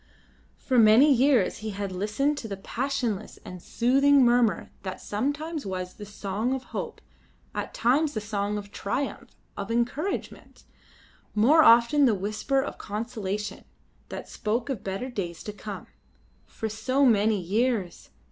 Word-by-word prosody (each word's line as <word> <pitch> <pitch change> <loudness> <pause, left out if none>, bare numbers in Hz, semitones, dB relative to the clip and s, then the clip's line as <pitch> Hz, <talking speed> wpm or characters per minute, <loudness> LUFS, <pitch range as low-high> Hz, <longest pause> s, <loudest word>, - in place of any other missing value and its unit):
For 255 -3 +1
many 230 +7 +7
years 255 -5 +3
he 215 0 -5
had 200 -1 -4
listened 210 +10 0
to 225 - -6
the 200 -2 -5
passionless 240 -1 -3
and 180 -1 -8
soothing 275 +5 +4
murmur 240 -6 +2
that 190 -1 -6
sometimes 290 +8 -3
was 185 -2 -4
the 205 - -10
song 205 +5 -2
of 265 - -6
hope, - - -5 0.5
at - - -5
times 285 +6 +2
the - - 0
song 205 0 -2
of 205 -1 -8
triumph, 250 +9 -3 0.3
of 200 0 -5
encouragement; 245 +11 -3 0.7
more 265 +10 +6
often 235 +5 +6
the 230 -5 +3
whisper 215 +8 -1
of - - -7
consolation 210 -2 -4 0.5
that - - -7
spoke 230 +5 -2
of 220 -6 -5
better 195 +6 -3
days 175 -7 -5
to 210 - -6
come. 210 -1 -7 0.6
For 220 - -5
so 255 +6 +1
many 215 -3 +3
years! 205 +1 -1
220 Hz, 145 wpm, -26 LUFS, 205-260 Hz, 0.7 s, many